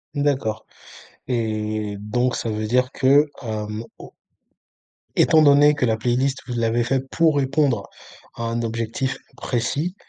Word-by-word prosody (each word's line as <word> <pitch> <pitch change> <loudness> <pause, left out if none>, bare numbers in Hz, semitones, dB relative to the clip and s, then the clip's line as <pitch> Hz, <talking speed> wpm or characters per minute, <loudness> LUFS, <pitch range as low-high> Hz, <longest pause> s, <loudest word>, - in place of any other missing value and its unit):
D'accord 135 -7 -1 0.6
et 110 -3 -2
donc, 120 +4 0
ça 115 - -3
veut 110 0 -2
dire 125 +3 +1
que, 145 +2 +3
hem, 110 -1 -4
au - - -12 1.0
étant 160 - +5
donné 145 0 +6
que 140 -4 0
la 110 -1 +1
playlist, 130 +4 0
vous 125 - -4
l'avez 115 0 +1
faite 135 +2 -1
pour 160 -3 +3
répondre 135 -5 +1 0.5
à 115 - -5
un 115 +1 -2
objectif 115 +3 -2 0.2
précis, 140 +9 -2
120 Hz, 135 wpm, -22 LUFS, 110-140 Hz, 1.0 s, donné